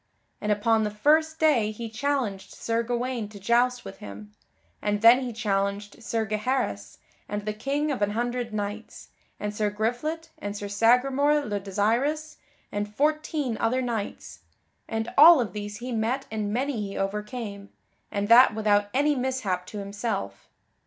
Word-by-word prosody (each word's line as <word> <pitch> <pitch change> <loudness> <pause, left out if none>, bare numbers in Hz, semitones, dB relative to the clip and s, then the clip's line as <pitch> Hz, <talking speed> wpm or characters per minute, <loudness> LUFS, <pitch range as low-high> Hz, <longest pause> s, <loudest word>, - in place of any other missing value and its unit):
And 210 - 0
upon 220 +2 +2
the 210 - 0
first 310 +9 +2
day 285 -10 +3
he 225 +2 -6
challenged 225 -4 -2
Sir 230 0 -1
Gawaine 240 -1 -2
to 210 -1 -11
joust 240 +4 +2
with 195 - -8
him, 105 +1 -10 0.5
and 205 0 -1
then 235 +2 +8
he 255 -2 -4
challenged 205 -1 -2
Sir 225 -1 -1
Gaheris, 215 - -2 0.3
and 205 0 -4
the 215 - -1
King 280 +7 -1
of 255 - -3
an 205 - +2
Hundred 240 0 -2
Knights, 210 +1 -5 0.3
and 210 0 -4
Sir 210 0 +1
Griflet, 245 +10 -2
and 205 0 -5
Sir 205 - -5
Sagramore 260 +7 +3
le 205 -1 -2
Desirous 240 +11 -1 0.3
and 205 0 -3
fourteen 295 -1 0
other 255 +3 +1
knights, 230 -4 -4 0.5
and 225 +1 -3
all 325 +1 +10
of 215 -7 -2
these 205 0 -5
he 250 +3 -6
met 240 +4 -1
and 215 -2 -2
many 255 0 -1
he 200 -1 -5
overcame, 205 +1 -4 0.4
and 205 0 -2
that 235 0 +7
without 205 -2 +2
any 290 +2 +3
mishap 250 -9 -2
to 210 - -8
himself. 200 - -4
225 Hz, 160 wpm, -26 LUFS, 205-255 Hz, 0.5 s, all